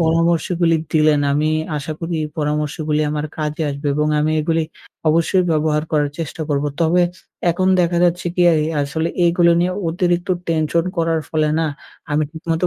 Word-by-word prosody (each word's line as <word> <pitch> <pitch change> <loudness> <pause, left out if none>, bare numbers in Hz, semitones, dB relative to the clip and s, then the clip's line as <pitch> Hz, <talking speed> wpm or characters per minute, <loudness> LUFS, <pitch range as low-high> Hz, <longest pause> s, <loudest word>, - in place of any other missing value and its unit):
পরামর্শগুলি 165 +1 +2 0.2
দিলেন 155 -2 +4
আমি 150 +2 +1 0.3
আশা 150 +2 -4
করি, 170 0 -4
এই 155 - -3
পরামর্শগুলি 150 0 -1
আমার 150 0 -2
কাজে 155 +1 -2
আসবে। 140 +1 -5
এবং 150 +1 +1
আমি 155 +1 +1
এগুলি 160 +1 0 0.5
অবশ্যই 170 +4 +2
ব্যবহার 155 -1 +1
করার 145 -2 +2
চেষ্টা 165 0 -4
করব। 145 -1 0 0.2
তবে 170 +2 +3 0.5
এখন 185 +2 +1
দেখা 170 0 +1
যাচ্ছে 175 0 0
কি, 180 - +2
এই 155 -1 +1 0.2
আসলে 160 +4 -2 0.2
এইগুলো 170 0 +4
নিয়ে 180 +1 +1 0.2
অতিরিক্ত 175 +1 0 0.2
টেনশন 165 0 +1
করার 165 -1 +1
ফলে 155 -1 +1
না 165 - +1 0.4
আমি 150 +1 +2
ঠিকমতো 165 +2 -2
160 Hz, 160 wpm, -19 LUFS, 150-170 Hz, 0.5 s, দিলেন